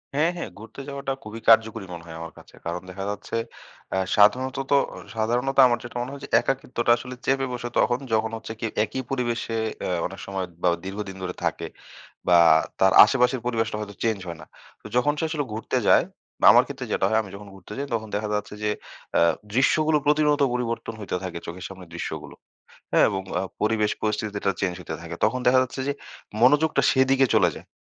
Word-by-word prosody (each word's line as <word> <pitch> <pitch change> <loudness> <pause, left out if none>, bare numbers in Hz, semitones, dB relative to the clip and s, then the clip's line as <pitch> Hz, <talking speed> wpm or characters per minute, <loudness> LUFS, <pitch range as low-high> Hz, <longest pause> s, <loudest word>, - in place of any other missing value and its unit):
হ্যাঁ, 160 +4 +3
হ্যাঁ! 170 - -5
ঘুরতে 110 +5 -10
যাওয়াটা 140 -1 -3
খুবই 110 +2 -8
কার্যকরী 110 -2 +4
মনে 85 -1 -8
হয় 80 -1 -8
আমার 85 -1 -8
কাছে। - - -16
কারণ 85 +1 -3
দেখা 95 +1 -6
যাচ্ছে 105 +2 -5 0.6
অ্যা 95 - 0 0.2
সাধারণতত 130 +6 +3 0.2
অ - - -9 0.2
সাধারণত 120 +5 0
আমার 120 -1 +1
যেটা 120 - -9
মনে, 125 +2 -4
হয় 140 - -8 0.2
একাকিত্বটা 125 -3 0
আসলে 125 +1 -8
চেপে 135 0 +2
বসে 120 0 -4
তখন 120 0 +2
যখন 110 0 +1
হচ্ছে 110 0 -7
কি - - -3 0.2
একি 110 +4 -4
পরিবেশে 120 -3 -2 0.2
অ্যা - - -2
অনেক 95 +2 -6
সময় 95 -1 -3 0.2
বা 90 - +5 0.2
দীর্ঘদিন 95 0 -5
ধরে 90 -1 -4
থাকে। - - -1 0.6
বা 90 -1 +6 0.4
তার 95 0 +5
আশেপাশের 125 +1 +1
পরিবেশটা 115 -3 -1
হয়তো 105 -1 -7
চেঞ্জ 110 -3 +1
হয় 85 -1 -6
না। - - -11 0.4
তো - - -9
যখন 145 +4 +3
সে - - -1
আসলে 150 -3 -2
ঘুরতে 110 - -2
যায় - - +6 0.4
বা - - +4
আমার - - +7
ক্ষেত্রে - - -6
যেটা - - +1
হয় 110 +1 +3
আমি 100 - -10
যখন 100 +1 -10
ঘুরতে 95 +2 -11
যাই 140 +1 -3
তখন 110 -1 -4
দেখা 105 +1 -1
যাচ্ছে 105 0 -4
যে 105 - +1 0.5
আ - - +4 0.3
দৃশ্যগুলো 155 +5 +3
প্রতিনিয়ত 150 0 +3
পরিবর্তন 115 -2 -3
হইতে 105 - -3
থাকে 90 -2 -5
চোখের 90 +2 -7
সামনে 95 -1 -10
দৃশ্যগুলো। 85 - -6 0.6
হ্যাঁ - - +6
এবং 95 -1 -2 0.2
আ - - -2 0.2
পরিবেশ 105 -1 +2
পরিস্থিতিটা 105 -2 -1
চেঞ্জ 90 -2 0
হইতে 80 -2 -6
থাকে 85 0 -6
তখন 130 - +1
দেখা 130 +1 +6
যাচ্ছে, 130 +1 -5
যে - - +2 0.5
মনোযোগটা 150 +5 +4
সেদিকে 135 0 +3
চলে 90 -5 +4
যায়। - - -11
115 Hz, 195 wpm, -25 LUFS, 100-130 Hz, 0.6 s, আমার